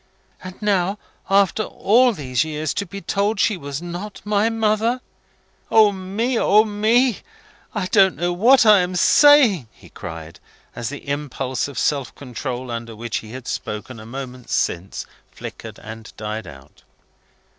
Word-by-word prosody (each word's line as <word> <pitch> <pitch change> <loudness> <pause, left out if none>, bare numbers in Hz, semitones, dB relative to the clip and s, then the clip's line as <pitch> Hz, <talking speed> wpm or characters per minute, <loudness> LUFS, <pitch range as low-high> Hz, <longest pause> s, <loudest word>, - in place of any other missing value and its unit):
And 185 0 -9
now, 195 -1 +1 0.3
after 200 +2 +3
all 240 +4 +3
these 135 - -1
years, 155 0 -3
to 200 - -3
be 200 +3 -8
told 200 +4 0
she 215 - +3
was 145 -1 -6
not 175 +4 -6
my 210 +1 +2
mother! 225 +2 +1 0.7
O 215 -2 +6
me, 205 +6 -2
O 210 +2 +5
me! 220 +3 +2 0.6
I 205 -3 -1
don't 190 -1 +4
know 175 +1 -1
what 240 +7 +5
I 210 -2 +7
am 180 0 -1
saying!" 235 - +5
he - - -18
cried, 80 0 -9 0.4
as 115 - -4
the 145 0 -9
impulse 140 -3 -2
of 140 -4 -10
self 140 -5 -1
control 125 -1 -5
under 115 -1 -6
which 115 +1 -3
he 110 - -8
had 130 0 -8
spoken 110 +3 -5
a 110 - -11
moment 130 0 -8
since, 90 +3 -2 0.3
flickered, - - -9
and 110 +1 -10
died 110 -2 -5
out. 70 -2 -14
175 Hz, 155 wpm, -21 LUFS, 125-210 Hz, 0.7 s, I